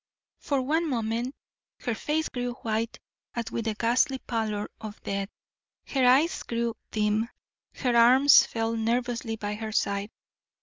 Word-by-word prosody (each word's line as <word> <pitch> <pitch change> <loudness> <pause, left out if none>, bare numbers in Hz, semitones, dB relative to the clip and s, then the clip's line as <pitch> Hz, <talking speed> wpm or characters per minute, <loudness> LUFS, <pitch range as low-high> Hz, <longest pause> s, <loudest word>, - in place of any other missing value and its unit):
For 275 -3 0
one 320 +4 +1
moment 235 +1 -1 0.5
her 240 - -1
face 305 +7 -1
grew 245 -1 -3
white 225 +1 -1 0.4
as 235 -2 -3
with 230 - -3
the 220 -1 -1
ghastly 250 +5 +2
pallor 220 -4 -2
of 215 -2 -7
death, 200 0 -2 0.6
her 265 -3 +2
eyes 275 +7 +4
grew 235 -1 -2
dim, 215 +1 +1 0.5
her 250 -3 0
arms 255 +4 +7
fell 225 0 -1
nervously 235 0 -1
by 210 -1 -4
her 215 +1 -5
side. 200 -1 0
230 Hz, 140 wpm, -27 LUFS, 220-255 Hz, 0.6 s, arms